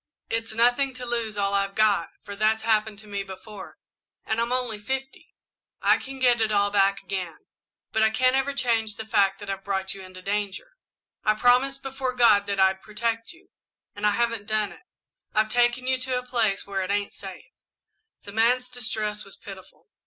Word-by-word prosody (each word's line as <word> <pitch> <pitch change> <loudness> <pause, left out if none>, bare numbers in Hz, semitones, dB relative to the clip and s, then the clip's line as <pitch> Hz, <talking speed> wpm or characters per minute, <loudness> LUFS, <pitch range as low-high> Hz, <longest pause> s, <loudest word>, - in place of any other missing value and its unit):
It's 225 -1 -2
nothing 245 +3 +3
to 250 0 -6
lose 230 -3 -1
all 200 0 +1
I've 195 0 0
got, 210 -5 +3
for 200 - -7
that's 215 +2 +1
happened 220 -1 +1
to 215 - -15
me 200 -1 -3
before, 195 +2 -10 0.5
and 220 +1 0
I'm 235 +1 -1
only 250 -4 -1
fifty 265 +5 -5 0.4
I - - +4
can 270 0 -8
get 245 -3 +3
it 220 -1 +1
all 205 -1 +2
back 200 -1 +2
again, 180 -5 -4 0.5
but 220 - +1
I 220 - +5
can't 255 +3 +3
ever 270 +1 +1
change 230 -5 0
the 220 - -6
fact 200 -3 +2
that 205 - -9
I've 195 0 -5
brought 190 -1 -2
you 195 - -9
into 185 0 -11
danger. 205 - -2 0.5
I 215 - +3
promised 255 +4 +3
before 265 -1 -3
God 215 -5 +5
that 200 -1 -1
I'd 190 0 +3
protect 230 +4 -2
you, 355 +2 -18 0.5
and 205 +1 +1
I - - +4
haven't 230 -3 0
done 215 -2 0
it. - - -14 0.5
I've 215 0 +3
taken 240 +2 +2
you 260 0 +1
to 255 0 -1
a 250 - -4
place 230 -6 +1
where 195 -1 -2
it 185 - -3
ain't 205 0 -1
safe." 195 -2 -9 0.8
The 200 - -9
man's 245 +4 +2
distress 215 -4 -3
was 195 - -11
pitiful. 190 - -12
215 Hz, 195 wpm, -25 LUFS, 200-245 Hz, 0.8 s, I